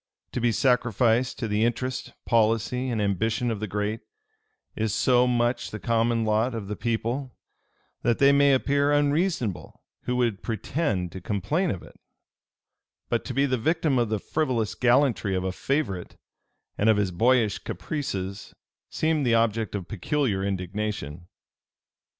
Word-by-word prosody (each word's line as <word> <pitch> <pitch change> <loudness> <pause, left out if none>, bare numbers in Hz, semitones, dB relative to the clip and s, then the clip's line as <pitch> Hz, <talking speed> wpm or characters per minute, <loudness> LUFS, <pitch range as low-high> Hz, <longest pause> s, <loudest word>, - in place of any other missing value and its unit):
To 125 - -3
be 120 0 +3
sacrificed 120 0 +2
to 115 - -3
the 105 +1 +1
interest, 125 +2 -2
policy, 115 +3 +1
and 115 -3 -1
ambition 110 +4 0
of 110 - -3
the 110 - -3
great, 105 +3 -2 0.8
is 110 -1 -1
so 125 +2 +4
much 120 0 0
the 105 - -6
common 115 0 +1
lot 110 +3 +1
of 105 -3 -5
the 105 - -3
people, 120 +4 -2 0.7
that 120 -1 +1
they 140 0 +6
may 140 -1 +5
appear 140 +2 +1
unreasonable 145 - 0 0.2
who 125 - -1
would 120 -5 0
pretend 110 - -2
to 95 - -8
complain 110 - -1
of 95 - -4
it: - - -16 1.1
but - - 0
to - - -4
be 140 +1 +3
the 130 -3 0
victim 155 0 +1
of 120 -2 +1
the 110 - 0
frivolous 120 -2 -1
gallantry 125 -5 +2
of 90 - -1
a 95 - -1
favorite, 100 - -2 0.6
and 105 - +3
of 110 - +5
his 100 -3 0
boyish 115 +3 +2
caprices, 100 - -5 0.3
seemed 155 -2 0
the 120 -3 +3
object 115 -1 +1
of 95 -3 -4
peculiar 110 - -1
indignation. 95 -4 -4
115 Hz, 150 wpm, -26 LUFS, 105-130 Hz, 1.1 s, they